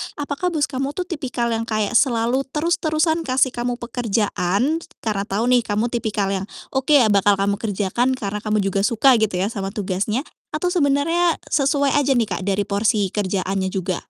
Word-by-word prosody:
Apakah 290 +4 -3
bos 320 -4 -1
kamu 270 +2 -3
tuh 365 - -1
tipikal 255 -8 -3
yang 230 0 -2
kayak 215 -2 -1
selalu 240 +1 +2
terus-terusan 320 0 +1
kasih 260 0 +2
kamu 245 0 -2
pekerjaan, 235 - -1
t 335 - -14
t - - -45
karena 210 -2 -2
tahu 205 +4 -1
nih 250 - +6
kamu 215 +3 0
tipikal 210 -4 -1
yang, 195 0 -2 0.3
oke, 265 +3 +1
ya 230 -7 +5
bakal 200 0 +4
kamu 200 +1 0
kerjakan, 215 +4 0
karena 210 -5 -3
kamu 215 -1 +1
juga 195 +1 0
suka, 245 +3 +4
gitu 210 -5 0
ya, 200 - 0
sama 195 -3 -5
tugasnya. 205 +4 -1 0.3
Atau 330 +4 0
sebenarnya 330 +1 +2
sesuai 280 -1 +2
aja 280 -1 +3
nih, 235 -4 +1
Kak, - - -6
dari 200 0 +1
porsi 205 0 +1
kerjaannya 190 -1 -1
juga? 185 -1 -1
230 Hz, 185 wpm, -21 LUFS, 200-275 Hz, 0.3 s, nih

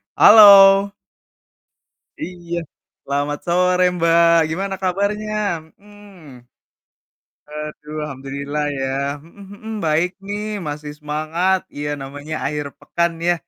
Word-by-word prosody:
Halo. 200 -2 +8 1.3
Iya. 175 -1 -5 0.4
Selamat 145 +1 -2
sore 180 +1 +2
Mbak, 170 -1 +4
gimana 195 +4 -3
kabarnya? 200 +3 -1 0.5
Mhm. 195 -11 -16 1.0
Aduh, 150 0 -8
alhamdulillah 140 +2 -5 0.2
ya. 135 - -2 0.3
Mhm 170 +6 -16
mhm. 220 +2 -9
Baik 160 +4 +1
nih, 205 +1 -4 0.2
masih 150 0 -6
semangat, 155 +5 -1 0.2
iya 145 0 -4
namanya 145 +3 -7
akhir 150 -1 -3
pekan 170 0 -1 0.2
ya, 175 - +4
170 Hz, 100 wpm, -19 LUFS, 150-195 Hz, 1.3 s, Halo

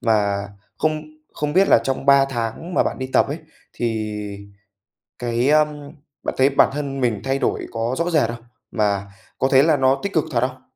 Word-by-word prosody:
Và 100 -3 +1 0.3
không 155 -1 0 0.3
không 150 0 -3
biết 190 +4 +4
là - - +7
trong 135 +1 -2
3 140 0 +6
tháng 135 +7 -4
mà - - +4
bạn - - -3
đi 130 - -3
tập - - +4
ấy, 145 +4 -4 0.3
thì 110 -3 -2 1.1
cái 120 +2 0
ờm, 150 -1 +1 0.3
bạn - - -3
thấy 135 +1 +5
bản 135 - +4
thân 140 -2 -4
mình 115 -5 0
thay 135 0 0
đổi - - -1
có 115 +2 -2
rõ 170 +1 0
rệt 145 -8 +2
không? 120 0 -7 0.3
Mà 100 -2 -1 0.3
có 130 - +2
thấy 135 0 +6
là 155 -1 +3
nó 135 0 +3
tích 200 - -3
cực 160 - +2
thật 120 - +1
không? 130 +1 -2
130 Hz, 200 wpm, -21 LUFS, 115-145 Hz, 1.1 s, là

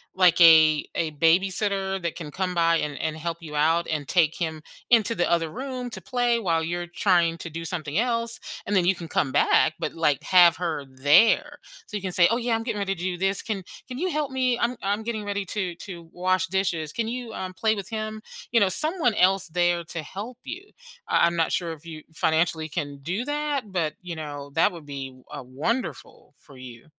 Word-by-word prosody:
like 180 -2 +5
a 160 -2 +7
a 165 -2 -1
babysitter 190 +4 +1
that 170 -2 -3
can 160 -4 -7
come 180 +4 -2
by 170 -1 +3
and 150 -3 -3
and 160 -1 -2
help 165 +1 -4
you 155 -2 -8
out 160 +3 +2
and 150 -3 -3
take 165 -3 +3
him 160 -3 -3 0.3
into 230 -1 +4
the 175 - +1
other 165 -2 +1
room 255 - -5
to - - -7
play 245 -1 +1
while 165 -7 0
you're 175 +2 -3
trying 175 -1 +2
to 170 0 -7
do 165 +1 -6
something 160 -3 -4
else, 230 0 0 0.3
and 205 - 0
then 185 -3 +3
you 185 - +4
can 175 -2 -8
come 140 -3 0
back, - - +3
but - - -3
like 150 -4 +1
have 175 -2 +6
her 160 -5 -3
there. 175 - +4 0.3
So 210 - -4
you 200 - -8
can 185 - -2
say, 175 -1 +5
"Oh 230 - +1
yeah, 240 -1 -1
I'm 225 - +1
getting 225 -2 -3
ready 200 -1 -1
to 175 - -9
do 180 -1 -2
this. 195 +2 0
Can 205 -4 -4 0.2
can 250 -1 -7
you 355 +6 -1
help 300 -2 -1
me? 255 -2 0
I'm 240 +1 0
I'm 200 +2 0
getting 220 -1 -4
ready 200 -1 -2
to 185 -3 -2
to 175 -3 -9
wash 185 +1 +1
dishes. 180 -5 -1
Can 230 -1 -2
you, 240 -1 -5
um, 185 -1 -6
play 220 +3 +2
with 200 -2 -6
him?" 215 -1 -4 0.3
You 235 - +4
know, 200 -3 +3
someone 305 - 0
else 190 0 +3
there 175 0 +1
to 165 -1 -6
help 210 - -7
you. 370 +9 -8 0.4
I - - +4
I'm 170 0 +1
not 165 -1 +1
sure 170 -2 -1
if 160 +1 -14
you 155 -2 -8
financially 160 0 +1
can 145 -2 -4
do 185 - -3
that, 290 -6 -2
but, 165 -5 -1
you 180 -2 -6
know, 145 -2 -7
that 160 - +4
would 165 -3 -10
be, 135 -2 -7 0.2
uh, 145 - -6
wonderful 150 - -4
for 140 - -17
you. 125 -2 -11
180 Hz, 220 wpm, -25 LUFS, 160-220 Hz, 0.4 s, a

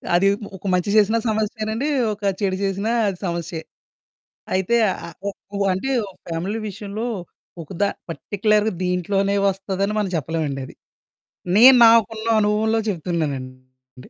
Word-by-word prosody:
అది 195 +3 +4 0.2
ఒ - - -8
ఒక 200 - -19
మంచి 180 +2 +1
చేసినా 215 +2 +4
సమస్యేనండీ, 220 +4 -2 0.3
ఒక 205 - -13 0.2
చెడు 190 -2 0
చేసినా 195 +3 -1 0.2
అది 190 -2 -2
సమస్యే. 170 -2 -3 0.9
అయితే, 190 +5 +1 0.2
ఆహ్, - - -6
ఆహ్, 165 - -11
ఒ - - +1 0.3
ఉ - - -2
ఆహ్, - - +2
అంటే, 230 +9 -3 0.4
ఫ్యామిలీ 180 +7 -3
విషయంలో 205 +2 -5 0.6
ఒక 160 - -12
ద - - +5 0.3
పర్టిక్యులర్‌గా 210 +4 0
దీంట్లోనే 195 +2 0
వస్తదని 195 +1 -1
మనం 200 -3 -1
చెప్పలేమండది. 145 -4 -3 0.8
నేను 255 +3 +9
నాకున్న 225 0 +3
అనుభవంలో 220 +2 +1
చెప్తున్నానండి. 130 -7 -5
195 Hz, 130 wpm, -22 LUFS, 170-215 Hz, 0.9 s, నేను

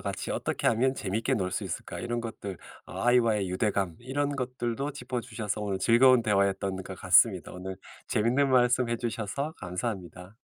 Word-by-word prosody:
같이 - - -4
어떻게 - - -2
하면 130 +4 +2
재밌게 115 +6 -1
놀 95 -5 -1
수 - - -2
있을까?" - - -5
이런 120 0 -2
것들 100 -5 -6 0.3
어 - - -6
아이와의 115 -5 +3
유대감 95 -3 0
이런 140 +3 -1
것들도 125 +1 -3
짚어 125 -3 -4
주셔서 110 -3 -4
오늘 100 -2 -2
즐거운 120 +4 +5
대화였던 100 -2 +1
것 95 0 -9
같습니다. 90 0 +4
오늘 95 +1 -6 0.3
재밌는 125 +6 +2
말씀해 125 -1 +3
주셔서 120 +5 -3
감사합니다. 90 0 -5
115 Hz, 385 characters per minute, -28 LUFS, 95-125 Hz, 0.3 s, 즐거운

